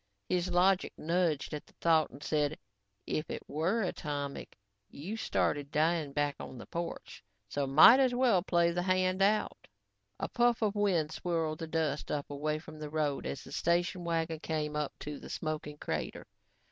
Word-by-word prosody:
His 180 Hz, 0 st, 0 dB
logic 185 Hz, +2 st, +3 dB
nudged 165 Hz, -3 st, 0 dB
at 150 Hz, -, -6 dB
the -, -, -21 dB
thought 160 Hz, -2 st, +3 dB
and 140 Hz, +3 st, -12 dB
said, 150 Hz, -1 st, 0 dB, 0.5 s
"If 155 Hz, -, -2 dB
it -, -, -6 dB
were 180 Hz, +10 st, 0 dB
atomic, 145 Hz, -5 st, -4 dB, 0.3 s
you 180 Hz, +10 st, -6 dB
started 145 Hz, -9 st, 0 dB
dying 155 Hz, -1 st, +1 dB
back 145 Hz, 0 st, 0 dB
on 130 Hz, -, -8 dB
the -, -, -9 dB
porch, 170 Hz, 0 st, -6 dB, 0.2 s
so 140 Hz, +6 st, -2 dB
might 160 Hz, -, +9 dB
as 255 Hz, -2 st, +3 dB
well 245 Hz, -7 st, +4 dB
play 170 Hz, -2 st, +2 dB
the 175 Hz, +1 st, -1 dB
hand 185 Hz, +1 st, +1 dB
out." 210 Hz, +2 st, +1 dB, 0.5 s
A -, -, -1 dB
puff 240 Hz, -1 st, +2 dB
of 210 Hz, -2 st, +2 dB
wind 185 Hz, -7 st, +1 dB
swirled 160 Hz, -2 st, -2 dB
the 165 Hz, -, -4 dB
dust 155 Hz, -2 st, -1 dB
up 145 Hz, -1 st, -3 dB
away 150 Hz, +2 st, -1 dB
from 155 Hz, 0 st, -11 dB
the 150 Hz, -1 st, -5 dB
road 150 Hz, -2 st, -1 dB
as 140 Hz, -, -5 dB
the -, -, -12 dB
station 175 Hz, +1 st, 0 dB
wagon 165 Hz, -1 st, -1 dB
came 155 Hz, -2 st, -2 dB
up 150 Hz, -1 st, -1 dB
to 150 Hz, -1 st, -5 dB
the -, -, -10 dB
smoking 155 Hz, -2 st, -4 dB
crater. -, -, -4 dB
160 Hz, 175 wpm, -32 LUFS, 150-180 Hz, 0.5 s, might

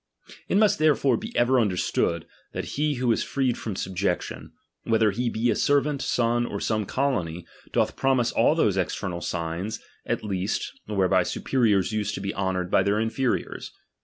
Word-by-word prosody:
It -, -, +3 dB
must 210 Hz, -5 st, +4 dB
therefore 145 Hz, -4 st, +3 dB
be 225 Hz, -, -5 dB
ever 125 Hz, +2 st, +4 dB
i -, -, +4 dB
Imderstood, 90 Hz, -4 st, 0 dB, 0.3 s
that -, -, -3 dB
he 150 Hz, 0 st, 0 dB
who 125 Hz, -1 st, +1 dB
is -, -, +1 dB
freed 130 Hz, -3 st, 0 dB
from 105 Hz, -4 st, -5 dB
subjection, 95 Hz, -1 st, -2 dB, 0.3 s
whether 110 Hz, -2 st, +3 dB
he 120 Hz, +4 st, -1 dB
be 115 Hz, +1 st, +1 dB
a -, -, +1 dB
servant, 145 Hz, 0 st, +2 dB
son, 120 Hz, -1 st, +1 dB
or 100 Hz, -, -4 dB
some 110 Hz, -2 st, -1 dB
colony, 90 Hz, -12 st, -1 dB, 0.3 s
doth -, -, +1 dB
promise 130 Hz, -3 st, +2 dB
all 120 Hz, +7 st, +3 dB
those 105 Hz, -, +2 dB
external 90 Hz, -1 st, -2 dB
signs 85 Hz, +5 st, -3 dB, 0.3 s
at -, -, -1 dB
least, 95 Hz, -2 st, -2 dB, 0.2 s
whereby 100 Hz, -3 st, +2 dB
superiors 110 Hz, -7 st, +1 dB
used 105 Hz, -1 st, -1 dB
to -, -, -5 dB
be 100 Hz, 0 st, -3 dB
honoured 95 Hz, -2 st, -2 dB
by -, -, +5 dB
their 100 Hz, +1 st, +1 dB
inferiors. 115 Hz, +3 st, -2 dB
110 Hz, 170 wpm, -25 LUFS, 95-130 Hz, 0.3 s, by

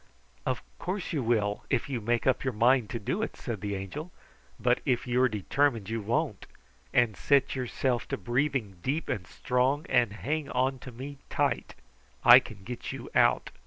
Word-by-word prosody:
"Of 130 Hz, -, -1 dB, 0.2 s
course 185 Hz, +1 st, -3 dB
you 150 Hz, -, 0 dB
will, 110 Hz, -4 st, 0 dB
if -, -, +1 dB
you 130 Hz, -5 st, -3 dB
make 120 Hz, +1 st, 0 dB
up 130 Hz, -, +2 dB
your 130 Hz, -4 st, -2 dB
mind 120 Hz, 0 st, +4 dB
to 120 Hz, -, -3 dB
do 145 Hz, -, -2 dB
it," 225 Hz, -, -3 dB
said 115 Hz, -6 st, -5 dB
the 100 Hz, -1 st, -2 dB
Angel. 120 Hz, -, -6 dB, 0.5 s
"But -, -, +2 dB
if 125 Hz, -2 st, 0 dB
you 125 Hz, +1 st, +1 dB
are 130 Hz, -, +4 dB
determined 115 Hz, 0 st, 0 dB
you 115 Hz, 0 st, -1 dB
won't, 110 Hz, +4 st, -1 dB, 0.4 s
and 120 Hz, -4 st, +3 dB
set 140 Hz, +6 st, +2 dB
yourself 125 Hz, -1 st, -1 dB
to -, -, -2 dB
breathing 120 Hz, -2 st, -1 dB
deep 145 Hz, -, -2 dB
and 90 Hz, -4 st, -2 dB
strong, 130 Hz, -, 0 dB
and 120 Hz, -4 st, +3 dB
hang 145 Hz, +6 st, -2 dB
on 130 Hz, +1 st, 0 dB
to 130 Hz, -, -9 dB
me 135 Hz, +4 st, -8 dB
tight, -, -, -1 dB, 0.5 s
I 120 Hz, +1 st, +10 dB
can 110 Hz, -6 st, -12 dB
get 120 Hz, +3 st, -6 dB
you -, -, -8 dB
out. -, -, +3 dB
125 Hz, 185 wpm, -29 LUFS, 110-135 Hz, 0.5 s, I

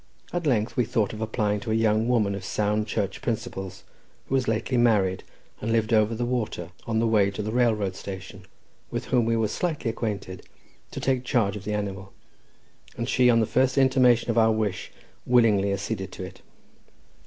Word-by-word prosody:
At 175 Hz, -3 st, -1 dB
length 115 Hz, -4 st, +1 dB
we 125 Hz, -, +3 dB
thought 110 Hz, -2 st, 0 dB
of 110 Hz, -, -7 dB
applying 105 Hz, -2 st, 0 dB
to 110 Hz, -, -7 dB
a 110 Hz, -, +1 dB
young 110 Hz, 0 st, +2 dB
woman 110 Hz, -5 st, +2 dB
of 100 Hz, -1 st, -5 dB
sound 105 Hz, +2 st, 0 dB
Church 100 Hz, -3 st, -2 dB
principles, 95 Hz, -4 st, -4 dB, 0.4 s
who -, -, -6 dB
was 130 Hz, -2 st, +1 dB
lately 110 Hz, +3 st, 0 dB
married, 105 Hz, -6 st, +2 dB, 0.4 s
and 115 Hz, -, -2 dB
lived 115 Hz, 0 st, +1 dB
over 110 Hz, +1 st, +3 dB
the 120 Hz, +2 st, -2 dB
water 110 Hz, -8 st, -3 dB, 0.2 s
on 115 Hz, -1 st, 0 dB
the 115 Hz, -, +2 dB
way 105 Hz, -3 st, +3 dB
to 100 Hz, +2 st, -5 dB
the 110 Hz, -, -3 dB
railroad 110 Hz, -6 st, +1 dB
station, 95 Hz, 0 st, -8 dB, 0.4 s
with -, -, -4 dB
whom 120 Hz, -3 st, +2 dB
we 115 Hz, 0 st, +1 dB
were 110 Hz, -1 st, +1 dB
slightly 155 Hz, -4 st, -2 dB
acquainted, 105 Hz, -5 st, -4 dB, 0.5 s
to -, -, -6 dB
take 130 Hz, -2 st, 0 dB
charge 110 Hz, -5 st, +1 dB
of 105 Hz, -1 st, -8 dB
the 105 Hz, -, -1 dB
animal; 100 Hz, -1 st, -5 dB, 0.8 s
and 115 Hz, -, -2 dB
she, 125 Hz, -1 st, +4 dB
on 115 Hz, -1 st, +4 dB
the -, -, +2 dB
first 130 Hz, +4 st, +1 dB
intimation 130 Hz, -3 st, +4 dB
of 115 Hz, -, +2 dB
our 110 Hz, 0 st, +5 dB
wish, 105 Hz, -4 st, -2 dB, 0.4 s
willingly 110 Hz, -5 st, +4 dB
acceded 100 Hz, -1 st, -3 dB
to -, -, -7 dB
it. 90 Hz, -, -10 dB
110 Hz, 190 wpm, -25 LUFS, 100-120 Hz, 0.8 s, our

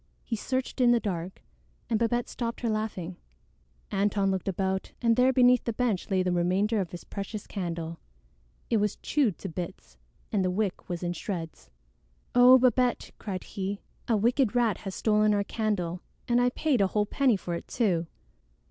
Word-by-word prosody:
He 230 Hz, -, -2 dB
searched 260 Hz, +4 st, -2 dB
in 245 Hz, -, +6 dB
the 240 Hz, -1 st, +5 dB
dark, 185 Hz, -3 st, -4 dB, 0.4 s
and 225 Hz, -2 st, +1 dB
Babette 235 Hz, +1 st, +1 dB
stopped 235 Hz, -1 st, -4 dB
her 230 Hz, -2 st, 0 dB
laughing. 195 Hz, -5 st, -3 dB, 0.8 s
Antone 200 Hz, 0 st, +2 dB
looked 190 Hz, 0 st, -2 dB
about, 190 Hz, 0 st, -1 dB
and 230 Hz, -2 st, +3 dB
there 250 Hz, +2 st, +4 dB
beneath 250 Hz, -1 st, +5 dB
the 235 Hz, -, -1 dB
bench 220 Hz, -5 st, -1 dB
lay 185 Hz, -1 st, +2 dB
the 180 Hz, -, 0 dB
remainder 190 Hz, +5 st, +1 dB
of 180 Hz, -, -4 dB
his 175 Hz, -, -8 dB
precious 200 Hz, +1 st, -6 dB
candle. 170 Hz, -4 st, -4 dB, 0.7 s
It 230 Hz, -, +4 dB
was 210 Hz, -1 st, +1 dB
chewed 265 Hz, -, +1 dB
to -, -, -6 dB
bits, 165 Hz, -, -7 dB, 0.3 s
and 200 Hz, -3 st, +1 dB
the 185 Hz, -, +1 dB
wick 190 Hz, 0 st, -2 dB
was 175 Hz, -1 st, -3 dB
in 175 Hz, 0 st, -1 dB
shreds. 165 Hz, -, -6 dB, 0.6 s
"Oh, 250 Hz, +1 st, +8 dB
Babette!" 250 Hz, 0 st, +2 dB
cried 190 Hz, -3 st, -4 dB
he. 195 Hz, +1 st, -4 dB, 0.2 s
"A 225 Hz, -, +3 dB
wicked 240 Hz, +2 st, +2 dB
rat 230 Hz, -6 st, +2 dB
has 195 Hz, -2 st, -6 dB
stolen 210 Hz, -1 st, +3 dB
our 200 Hz, -, +1 dB
candle, 195 Hz, -5 st, -2 dB, 0.3 s
and 240 Hz, 0 st, +3 dB
I 245 Hz, -, +4 dB
paid 265 Hz, -2 st, +1 dB
a 195 Hz, -, +4 dB
whole 210 Hz, +2 st, +1 dB
penny 250 Hz, 0 st, +2 dB
for 175 Hz, -2 st, -5 dB
it 170 Hz, -, -5 dB
too!" 180 Hz, -8 st, 0 dB
205 Hz, 180 wpm, -28 LUFS, 185-235 Hz, 0.8 s, Oh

